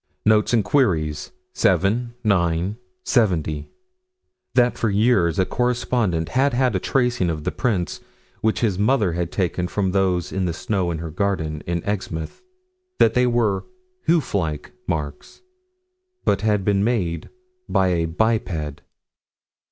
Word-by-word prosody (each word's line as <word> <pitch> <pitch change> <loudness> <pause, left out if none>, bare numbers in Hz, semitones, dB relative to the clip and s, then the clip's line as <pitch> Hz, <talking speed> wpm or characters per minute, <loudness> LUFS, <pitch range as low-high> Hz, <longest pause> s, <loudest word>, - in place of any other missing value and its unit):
Notes 105 0 +4
and 115 -4 +2
Queries, 80 - +1 0.2
7 120 +5 +1
9 90 -1 +1 0.3
70: 80 - +1 0.9
That 125 -1 +4
for 115 - 0
years 100 -5 +3
a 95 - +3
correspondent 120 -9 0
had 135 +2 +2
had 130 0 +2
a - - +2
tracing 125 -8 +1
of 75 -2 -3
the - - -1
prints, 100 -8 -1 0.4
which 110 0 +1
his 100 -5 +1
mother 105 -3 +2
had 85 0 -2
taken 90 -2 -1
from 95 0 -1
those 90 -2 +1
in 95 -1 -1
the 85 - -1
snow 95 0 -1
in 85 - -2
her 80 0 -6
garden, 80 -4 -1
in 85 -1 -1
Exmouth: 90 -6 -4 0.6
that 115 - +4
they 125 +1 +3
were 110 -5 +1 0.4
hoof 165 -4 +2
like 80 -7 -2 0.2
marks 75 - -4 0.8
but 100 - +2
had 105 -3 +1
been 100 -1 +2
made 100 -8 -1 0.4
by 95 -1 +3
a 85 -2 +1
biped. 80 -6 -1
95 Hz, 140 wpm, -22 LUFS, 85-115 Hz, 0.9 s, Notes